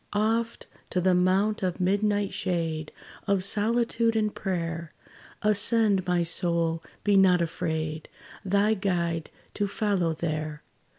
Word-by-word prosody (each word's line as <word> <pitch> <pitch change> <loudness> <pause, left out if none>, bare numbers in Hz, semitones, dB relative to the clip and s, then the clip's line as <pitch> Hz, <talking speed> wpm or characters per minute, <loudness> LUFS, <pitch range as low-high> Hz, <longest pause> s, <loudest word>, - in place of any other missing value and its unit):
Oft 225 +2 0 0.2
to 185 - 0
the 185 +1 +3
mount 190 +4 +2
of 185 -1 -2
midnight 205 +2 +1
shade, 165 -4 -2 0.4
Of 200 -2 +2
solitude 230 +3 +1
and 215 -1 0
prayer, 170 -3 -4 0.5
Ascend, 210 -2 +3
my 175 -1 +2
soul, 170 -1 +1 0.2
be 205 -1 +3
not 190 -2 +5
afraid 160 -2 -3 0.3
Thy 200 +2 +2
Guide 170 -5 -1 0.2
to 205 - -1
follow 195 -5 0
there. 155 -2 -4
185 Hz, 120 wpm, -27 LUFS, 170-205 Hz, 0.5 s, not